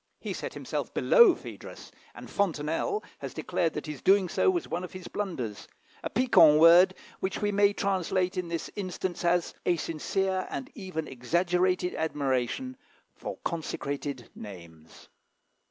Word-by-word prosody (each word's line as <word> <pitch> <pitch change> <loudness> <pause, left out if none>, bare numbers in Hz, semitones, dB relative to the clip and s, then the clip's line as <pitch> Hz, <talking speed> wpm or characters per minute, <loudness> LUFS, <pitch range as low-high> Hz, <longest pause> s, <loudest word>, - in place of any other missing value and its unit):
He - - -4
set - - -6
himself - - -4
below 470 -8 +6
Phædrus, - - -10 0.2
and - - -10
Fontenelle 170 - -1 0.2
has - - -7
declared 165 -2 -1
that 150 - -5
his 150 -4 -7
doing 190 -1 +4
so 385 - +2
was 355 -2 0
one 180 - -3
of 180 - -8
his 185 -1 -8
blunders 135 - -4 0.3
a - - -3
piquant 200 -11 +6
word, 175 +3 +7 0.2
which 190 +1 -2
we 205 -1 0
may 200 0 +4
translate 185 -1 0
in 180 -2 -2
this 170 -1 -4
instance 185 -2 -4
as 175 0 +1
"a 175 - +2
sincere 185 +4 -1
and 265 +3 -5
even 185 - -5
exaggerated 180 +7 0
admiration 150 - -1 0.4
for - - -7
consecrated 145 -5 -4
names." 85 -6 -12
180 Hz, 145 wpm, -28 LUFS, 150-195 Hz, 0.4 s, word